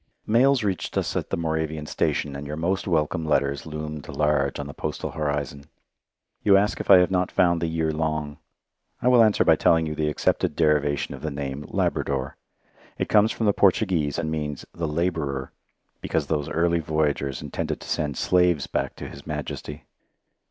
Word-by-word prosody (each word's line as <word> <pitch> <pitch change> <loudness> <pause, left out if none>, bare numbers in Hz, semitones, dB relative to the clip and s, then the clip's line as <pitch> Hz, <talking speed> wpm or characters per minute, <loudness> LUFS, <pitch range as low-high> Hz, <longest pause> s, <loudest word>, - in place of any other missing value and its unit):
Mails 125 +3 +3
reached 95 -3 -2
us - - -1
at - - -2
the - - -1
Moravian 80 -2 -2
station, 75 -1 -1
and 70 +1 -6
your 75 - -4
most 90 +5 -1
welcome 80 -2 0
letters 70 -2 0
loomed 75 -1 -6
large 75 -2 +1
on 70 - -4
the 70 - -8
postal - - -4
horizon. 75 -2 -3 0.8
You 100 -1 +5
ask 105 +2 +1
if - - -6
I 95 - +10
have 90 +1 +3
not 90 -1 +1
found 85 -2 +2
the 85 - 0
year 80 -1 0
long. 75 -2 -2 0.6
I - - -1
will 125 -2 +7
answer 110 -2 +3
by - - +5
telling 80 -1 +3
you 75 - -3
the 75 0 0
accepted 75 - 0
derivation 75 -2 +1
of - - -9
the 80 - -2
name 70 0 -5
"Labrador." 70 -1 -1 0.6
It - - -2
comes 105 +1 +4
from 115 - -2
the 105 - +4
Portuguese, 90 -8 +2
and 80 - -2
means 75 -3 -4
"the 85 -1 -3
labourer," 75 -4 -2 0.5
because - - -1
those 75 -3 -2
early 85 +1 +1
voyagers 75 -4 -1
intended - - -3
to - - -10
send 75 -4 -2
slaves 90 -5 +2
back - - -2
to - - -7
His 70 - -11
Majesty. 75 -2 -5
80 Hz, 180 wpm, -25 LUFS, 75-85 Hz, 0.8 s, I